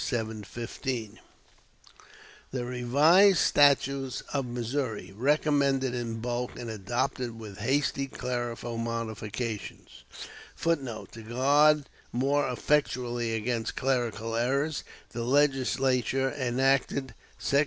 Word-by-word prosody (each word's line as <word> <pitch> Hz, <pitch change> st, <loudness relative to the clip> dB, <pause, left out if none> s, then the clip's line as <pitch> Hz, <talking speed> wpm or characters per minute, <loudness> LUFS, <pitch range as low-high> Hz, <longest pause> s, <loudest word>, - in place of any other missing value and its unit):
715.] 115 Hz, 0 st, -4 dB, 1.3 s
The 125 Hz, -2 st, -3 dB
"Revised 145 Hz, +11 st, +5 dB
Statutes 140 Hz, -3 st, +3 dB
of 135 Hz, -3 st, -1 dB
Missouri," 120 Hz, -5 st, -3 dB
recommended 140 Hz, 0 st, +2 dB
in 115 Hz, -2 st, -3 dB
bulk, 120 Hz, +1 st, -3 dB
and 120 Hz, -2 st, -5 dB
adopted 120 Hz, +3 st, -2 dB
with 105 Hz, -4 st, -9 dB
hasty 140 Hz, 0 st, 0 dB
clerical 120 Hz, -2 st, -4 dB
modifications, 115 Hz, -1 st, -5 dB, 0.5 s
[Footnote: 135 Hz, -9 st, -2 dB
To 115 Hz, -, -10 dB
guard 140 Hz, +6 st, +4 dB, 0.3 s
more 140 Hz, +4 st, +1 dB
effectually 120 Hz, -4 st, 0 dB
against 115 Hz, 0 st, -2 dB
clerical 115 Hz, -4 st, -1 dB
errors, 140 Hz, +6 st, 0 dB, 0.3 s
the 120 Hz, -, -4 dB
Legislature 135 Hz, -1 st, +2 dB
enacted: 135 Hz, 0 st, +1 dB, 0.2 s
"Sec. 140 Hz, -, +2 dB
125 Hz, 90 wpm, -28 LUFS, 115-140 Hz, 1.3 s, Revised